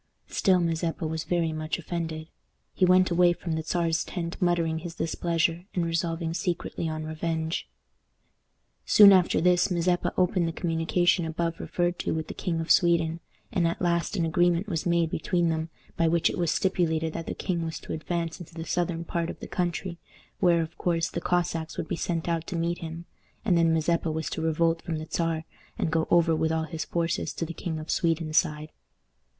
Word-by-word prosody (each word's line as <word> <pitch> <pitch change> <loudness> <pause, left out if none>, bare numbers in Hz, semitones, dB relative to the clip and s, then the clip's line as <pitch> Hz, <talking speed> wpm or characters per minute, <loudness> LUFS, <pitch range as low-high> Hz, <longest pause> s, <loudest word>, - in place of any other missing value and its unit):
Still, 185 -3 +3
Mazeppa 165 -1 -1
was 160 0 -3
very 170 -2 +1
much 155 0 -2
offended. 165 -2 -4 0.5
He 185 - +3
went 185 0 +4
away 175 0 +5
from 170 0 -6
the 160 0 -1
Czar's 165 0 0
tent 170 -2 -4
muttering 170 -2 +1
his 170 0 -7
displeasure, 165 +1 0
and 175 -2 +1
resolving 165 0 -1
secretly 170 -2 -2
on 155 0 -4
revenge. 160 +1 -3 1.1
Soon 205 -1 +8
after 185 -2 +4
this 180 +2 +3
Mazeppa 175 0 +1
opened 180 -1 +2
the 165 - -3
communication 170 +1 +1
above 165 +1 -2
referred 175 0 -1
to - - -1
with 160 -1 -4
the - - -4
King 170 -4 -2
of 165 - -1
Sweden, 170 -1 +3 0.3
and 175 -2 +2
at 165 - -2
last 170 +2 0
an 170 - +1
agreement 175 +3 +2
was 170 -4 -2
made 170 -1 +2
between 175 +1 +1
them 160 0 -2 0.3
by 165 - +3
which 165 0 +3
it - - -5
was 170 -2 +1
stipulated 160 -4 +1
that 165 - -5
the - - -3
king 170 -3 -2
was 160 -1 -4
to - - -6
advance 165 +1 -3
into 170 -1 -11
the 165 -1 -5
southern 170 0 -1
part 170 0 -2
of - - -7
the - - -7
country, 175 0 -2 0.4
where, 170 -3 +4
of 160 +1 -10
course, 165 -2 0
the - - -3
Cossacks 170 -2 -1
would - - -3
be - - -2
sent 165 -1 -2
out 165 -1 -1
to 185 - -4
meet 170 +1 -1
him, 165 +1 -7 0.4
and 190 -5 +3
then 165 -1 +4
Mazeppa 165 +1 +1
was 160 0 -3
to - - -3
revolt 165 +1 +1
from 165 -2 -3
the 155 +1 -6
Czar, 165 -1 -1 0.3
and 160 - -1
go 160 0 +1
over 165 -1 +4
with 160 0 +1
all 160 0 0
his 160 -2 -4
forces 170 -1 -1
to 165 - -2
the 170 - -6
King 165 -2 -4
of 155 0 -5
Sweden's 165 -2 0
side. 155 -2 +1
165 Hz, 200 wpm, -27 LUFS, 160-175 Hz, 1.1 s, Soon